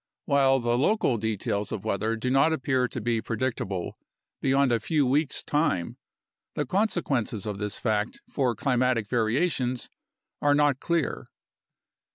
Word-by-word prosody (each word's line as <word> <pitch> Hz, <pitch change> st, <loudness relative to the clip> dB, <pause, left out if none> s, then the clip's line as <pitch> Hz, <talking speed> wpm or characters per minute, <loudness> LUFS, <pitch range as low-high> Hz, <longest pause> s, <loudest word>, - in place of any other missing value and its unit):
While 135 Hz, -1 st, +4 dB
the 120 Hz, 0 st, +1 dB
local 150 Hz, -, +2 dB
details 105 Hz, -1 st, -2 dB
of 105 Hz, 0 st, -5 dB
weather 110 Hz, +2 st, 0 dB
do 125 Hz, +3 st, -2 dB
not 135 Hz, +4 st, +4 dB
appear 130 Hz, -4 st, +1 dB
to -, -, -5 dB
be 115 Hz, -2 st, 0 dB
predictable 110 Hz, -6 st, -3 dB, 0.4 s
beyond 135 Hz, -1 st, +3 dB
a 115 Hz, -, +2 dB
few 150 Hz, +5 st, +1 dB
weeks' 140 Hz, +3 st, +1 dB
time, 145 Hz, -, 0 dB, 0.6 s
the 150 Hz, -, -1 dB
consequences 140 Hz, -, -1 dB
of 105 Hz, -2 st, -4 dB
this 105 Hz, -1 st, -3 dB
fact 110 Hz, -1 st, -1 dB
for 125 Hz, -5 st, 0 dB
climatic 125 Hz, -2 st, +1 dB
variations 125 Hz, +2 st, 0 dB, 0.5 s
are 145 Hz, 0 st, +4 dB
not 145 Hz, -2 st, +3 dB
clear. 170 Hz, -3 st, -1 dB
125 Hz, 140 wpm, -27 LUFS, 110-140 Hz, 0.6 s, While